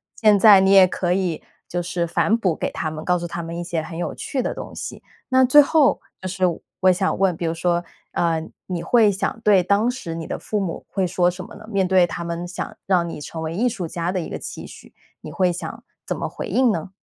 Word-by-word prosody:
现 210 -2 +4
在 200 -2 +8
你 190 0 +3
也 190 -2 +8
可 175 0 -2
以， 180 -4 -1 0.2
就 175 - -2
是 175 0 -2
反 210 +6 +2
哺 185 -8 0
给 - - -3
他 170 -4 -3
们， 155 0 -7
告 180 +1 +1
诉 175 - -4
他 170 0 -5
们 165 +1 -6
一 175 - -3
些 170 -2 -2
很 165 +1 -8
有 175 - -3
趣 265 - -3
的 - - -2
东 - - -8
西。 - - -7 0.2
那 260 -1 +4
最 280 +4 +8
后 295 0 +3 0.2
就 185 - -4
是 185 0 -4 0.4
我 185 - +4
想 190 +1 0
问， 190 -3 +2
比 170 - -3
如 165 - 0
说， 175 +1 0 0.3
呃， 165 -2 0 0.3
你 175 -3 -3
会 225 -4 +4
想 195 +3 -3
对 200 -4 +4
当 200 +5 +2
时 250 -10 -5
你 165 -1 -6
的 - - -3
父 210 - -3
母 185 -4 -4
会 190 -2 0
说 175 0 +2
什 180 +1 -8
么 - - -12
呢？ 215 - -12
面 195 -4 +1
对 185 -1 +5
他 170 0 -5
们 170 +1 -4
想 180 - -6
让 180 -3 +2
你 150 - -7
成 160 +2 -6
为 160 +1 -4
艺 240 +6 +2
术 190 -8 -4
家 170 +2 -3
的 185 - -1
一 165 - -5
个 - - -4
期 - - -8
许， - - -14 0.3
你 - - -8
会 185 -2 +2
想 180 - -7 0.2
怎 - - -2
么 - - -3
回 - - -6
应 255 -3 +3
呢？ 165 +3 -4
180 Hz, 270 characters per minute, -22 LUFS, 170-200 Hz, 0.4 s, 在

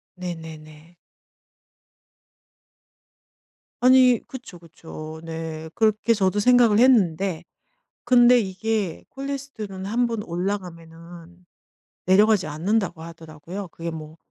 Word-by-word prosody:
네 180 -1 -5
네 160 -1 -10
네. 155 +3 -17 2.8
아니 255 -2 +5
그쵸, 250 -9 -10
그쵸. 160 -1 -11
네. 160 -1 -6
그렇게 220 +1 +2
저도 195 0 +1
생각을 235 -2 +4
했는데 190 -8 +2 0.6
근데 245 0 +6
이게 200 -2 -3
콜레스테롤은 270 -9 -6
1 240 +4 0
번 225 -3 -4
올라가면은 175 -1 -7 0.6
내려가지 205 -1 +4
않는다고 175 +3 -2
하더라고요. 165 +3 -9
그게 170 +1 -6
뭐 155 0 -9
185 Hz, 220 characters per minute, -23 LUFS, 165-225 Hz, 2.8 s, 근데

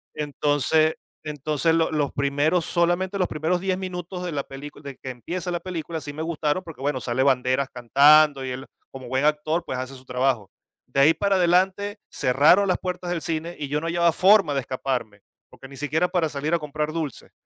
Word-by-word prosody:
Entonces, 150 +1 +1 0.3
entonces, 150 +1 0
lo 165 -1 +1
los 150 -3 0
primeros, 145 +5 +1
solamente 175 +3 0
los 185 - +2
primeros 160 +4 -1
10 190 -1 0
minutos 180 -1 -5
de 175 - -3
la 140 -2 -2
película 145 +2 -10
de 140 -2 -8
que 130 - -8
empieza 175 +9 -5
la 175 - -1
película 170 -2 -5
sí 145 - -7
me 155 - -6
gustaron, 165 +1 -1
porque 160 -6 -11
bueno, 140 -2 -1
sale 125 +2 0
Banderas 130 0 +2
cantando 140 +3 +5
y - - -4
él, 130 +2 -6 0.3
como 130 -2 -9
buen 130 +3 0
actor, 155 +2 +1
pues, 130 - -4
hace 130 +1 -6
su 130 0 -14
trabajo. 125 -5 -1 0.4
De 140 - +1
ahí 155 +4 +6
para 200 +3 +1
adelante 190 +4 +2
cerraron 150 +10 +4
las 185 - +2
puertas 180 -1 -4
del 170 -2 -2
cine 165 +1 -3
y 145 - -3
yo 150 +1 -1
no 165 - -3
hallaba 170 0 +3
forma 190 -5 +5
de 135 - 0
escaparme, 125 -5 -4 0.3
porque 135 - -13
ni 135 - -11
siquiera 155 +5 0
para 175 -4 0
salir 150 +2 -3
a 170 - +3
comprar 150 +1 -3
dulces. 155 -6 -5
155 Hz, 205 wpm, -24 LUFS, 135-175 Hz, 0.4 s, ahí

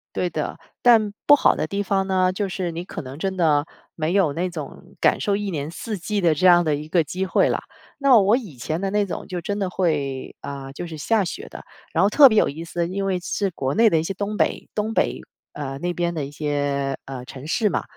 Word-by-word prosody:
对 180 - 0
的。 155 -3 -4 0.2
但 225 -4 +5 0.2
不 290 - +9
好 - - +3
的 - - -1
地 200 +4 -2
方 195 -1 0
呢， 185 -1 +2
就 200 +2 -2
是 185 -2 -3
你 170 +2 -6
可 - - -6
能 130 +1 -9
真 190 +2 -2
的 155 -5 +3 0.3
没 160 +1 -1
有 190 -6 +3
那 180 +4 -1
种 175 +3 -9
感 - - +4
受 200 - +1
一 205 -1 -3
年 150 -3 -3
四 215 +5 -5
季 205 +3 -2
的 170 -3 +4
这 170 +5 +3
样 175 -1 +7
的 155 -2 +1
一 150 +1 -6
个 165 +1 +2
机 185 +5 -3
会 185 - +2
了。 - - 0 0.4
那 275 -4 +6
我 205 +4 +4
以 210 - -8
前 155 +6 -3
的 195 +1 -1
那 205 0 +2
种 190 - -6
就 180 -1 -4
真 205 +4 -3
的 195 -2 -1
会， 145 -8 -1
呃， 135 -1 -7
就 175 +5 -6
是 160 -2 -7
下 210 +6 +1
雪 400 - -6
的， - - -10 0.3
然 - - +1
后 200 - +4
特 275 +5 +8
别 220 - +1
有 - - +3
意 155 +4 -6
思， 170 0 -2
因 195 +2 -3
为 190 -2 0
是 195 +3 -1
国 135 -5 -2
内 225 +1 +6
的 165 - +2
一 - - -1
些 195 - -3
东 205 +2 -3
北 - - 0
东 215 +1 -2
北， 65 - +1 0.3
呃， 135 -2 -5
那 175 +3 -2
边 175 0 -1
的 155 -3 -3
一 140 - -9
些， 145 -2 -1
呃， 130 -2 -7
城 135 0 -10
市 210 +6 +1
嘛。 - - -1
175 Hz, 270 characters per minute, -23 LUFS, 150-200 Hz, 0.4 s, 不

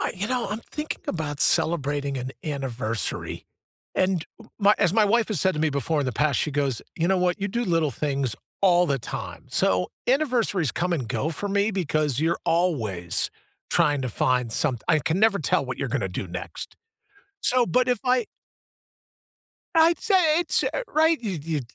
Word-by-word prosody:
I - - -1
you 195 +2 -3
know, 250 0 -1
I'm 215 +2 -3
thinking 300 0 -5
about 150 -4 -3
celebrating 145 -3 +1
an 130 0 -4
anniversary, 125 -7 -3 0.5
and 185 -3 +1 0.3
my 205 0 +5
as 175 -4 +3
my 220 0 +4
wife 225 +3 +2
has 205 -9 +1
said 190 -1 +2
to 150 - -2
me 155 -1 +2
before 140 +2 0
in 140 - -1
the 130 - -1
past, 145 +3 +1
she 150 - 0
goes, 140 -4 -1
you 170 +1 +1
know 190 -1 +3
what, 180 +1 0
you 200 - -1
do 235 +5 -1
little 165 -5 +1
things 135 -2 -1 0.3
all 180 -2 +5
the 140 -3 0
time. - - -7
So, 90 -1 +1 0.2
anniversaries 240 - +1
come 180 +1 -1
and 135 -9 -2
go 155 +8 -1
for 200 +6 -4
me 200 +2 +1
because 155 - 0
you're 165 +2 +1
always 115 - 0 0.4
trying 145 -5 +2
to 130 - -2
find 125 0 0
some 130 +1 +1
I 155 - +5
can 160 +5 -1
never 215 -1 +4
tell - - +1
what - - -5
you're - - -2
gonna - - -1
do - - -4
next. - - -7 0.6
So, 250 -1 +3
but 250 +1 +2
if 250 - +2
I 250 -2 +2 1.5
I'd 330 0 +5
say 360 -7 +3
it's, 345 - +1
eh - - -1
right. 320 -2 +3
You 190 -7 -3
you 155 -1 -2
170 Hz, 190 wpm, -25 LUFS, 140-215 Hz, 1.5 s, my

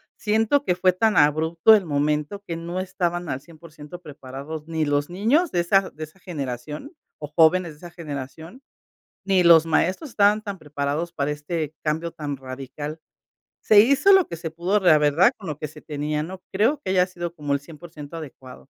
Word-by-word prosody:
siento 225 +6 +1
que - - +2
fue 185 +1 +3
tan 210 +4 +1
abrupto 160 +7 +4
el 200 -3 0
momento 150 +5 -1
que 170 - -3
no 170 +2 -5
estaban 175 -2 -2
al 130 - -3
100% 160 +1 -13
preparados 140 +1 -8
ni 160 -1 -1
los 145 +1 0
niños 250 - +1
de 175 - 0
esa 190 +3 +2
de 155 +2 -7
esa 155 +5 -22
generación 150 - -6 0.3
o 150 - -6
jóvenes 165 +2 +3
de - - -19
esa 175 +3 -11
generación, 160 - -8 0.6
ni 190 -2 +3
los 165 -1 +6
maestros 185 - 0
estaban 210 -2 +3
tan 200 -2 -6
preparados 150 +1 -3
para 140 -3 -2
este 150 +1 -4
cambio 160 +2 -1
tan 145 -2 -5
radical. 135 +4 -7 0.6
Se 215 - +5
hizo 280 - +5
lo 380 -2 +5
que 170 - -7
se 165 -1 -5
pudo, 175 +6 0
la 175 -5 +6
verdad, 150 - +4
con 195 - -12
lo 150 -3 -5
que 155 - -5
se 150 +1 -14
tenía. 150 0 -3
No 185 +3 -8
creo 225 +10 +1
que 185 - -4
haya 180 -1 +4
sido 175 -2 -6
como 145 -4 -4
el 140 - +1
100% 155 0 -11
adecuado. 130 -5 -11
165 Hz, 190 wpm, -23 LUFS, 150-185 Hz, 0.6 s, los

